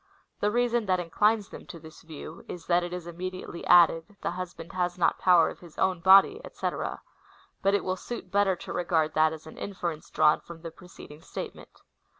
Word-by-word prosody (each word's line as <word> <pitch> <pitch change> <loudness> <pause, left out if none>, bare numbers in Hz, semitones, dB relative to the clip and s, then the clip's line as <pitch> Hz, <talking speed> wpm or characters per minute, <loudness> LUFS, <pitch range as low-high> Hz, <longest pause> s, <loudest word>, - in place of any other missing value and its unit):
The 205 - +2
reason 240 -1 +1
that 185 -1 +2
inclines 210 +5 +1
them - - -11
to 170 - -9
this 160 0 -14
view 160 0 -10
is, 170 -2 -8
that 175 0 +3
it 175 0 -5
is 180 -1 -5
immediately 180 0 -6
added, 175 +3 +5
The - - -1
hv^band 175 -2 -7
has 180 -1 -1
not 175 - +2
power 180 -3 +5
of - - -13
his 170 -3 -15
own 185 -2 +1
body, 195 - +6
&c.; - - -2 0.9
but 195 +1 +3
it 200 - 0
will 185 0 -2
suit 210 -3 -7
better 200 -1 +3
to - - -8
regard 165 -3 0
that 155 0 +4
as 160 -1 -9
an 160 - -11
inference 175 -6 -5
drawn 150 - +4
from 170 -1 -12
the 165 - -6
preceding 165 -4 -13
statement. - - -9
180 Hz, 195 wpm, -28 LUFS, 165-190 Hz, 0.9 s, body